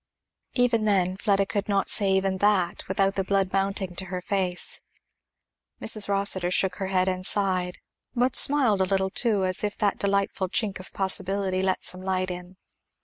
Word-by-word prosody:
Even 235 -3 +2
then 185 -3 +1
Fleda 200 0 +1
could 200 +1 -3
not 200 -1 +1
say 200 -2 +3
even 190 0 0
that 190 -4 +1
without 195 +1 +1
the 195 - -1
blood 195 -1 0
mounting 195 -2 -1
to 190 - -3
her 185 0 -5
face. 185 -1 -1 1.0
Mrs. 215 -2 +2
Rossitur 195 -3 +2
shook 185 0 0
her 190 - -3
head 185 -1 +1
and 185 -1 -2
sighed; 185 -2 +1 0.4
but 250 +1 +1
smiled 255 -9 +4
a - - +3
little 190 0 0
too, 210 -5 +1
as 185 +2 -1
if 205 0 -2
that 205 -3 0
delightful 200 -1 -1
chink 200 -1 -1
of 185 - -10
possibility 190 0 0
let 190 -1 -1
some 185 0 -2
light 185 -1 -2
in. 180 +1 -9
195 Hz, 175 wpm, -25 LUFS, 185-200 Hz, 1.0 s, smiled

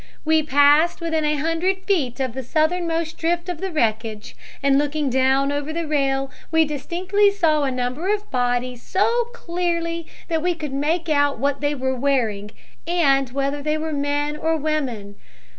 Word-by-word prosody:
"We 315 0 +4
passed 295 +3 +4
within 320 -2 -1
a 300 0 +2
hundred 330 +5 0
feet 285 - 0
of 260 -3 -1
the 265 - -4
southernmost 325 +4 -1
drift 345 +2 0
of 350 -3 -5
the 385 - -2
wreckage, 220 -6 -1 0.3
and 275 0 +4
looking 290 -1 -1
down 265 +2 +2
over 290 +1 -3
the 335 +1 -3
rail 275 -3 0 0.2
we 320 0 +4
distinctly 365 +8 +1
saw 330 -7 +2
a 270 - 0
number 255 +9 -2
of 420 0 -3
bodies 245 -1 -1
so 465 +5 +1
clearly 335 -5 -2 0.2
that 325 -2 0
we 350 +1 0
could 300 -4 -6
make 320 +5 0
out 285 -2 +2
what 280 +3 -1
they 290 0 0
were 260 -1 -1
wearing 240 -6 0 0.4
and 275 -7 +2
whether 275 +2 -2
they 305 +1 0
were 315 0 -3
men 290 +1 -1
or 320 +1 0
women. 265 -10 -3
300 Hz, 170 wpm, -22 LUFS, 270-335 Hz, 0.4 s, We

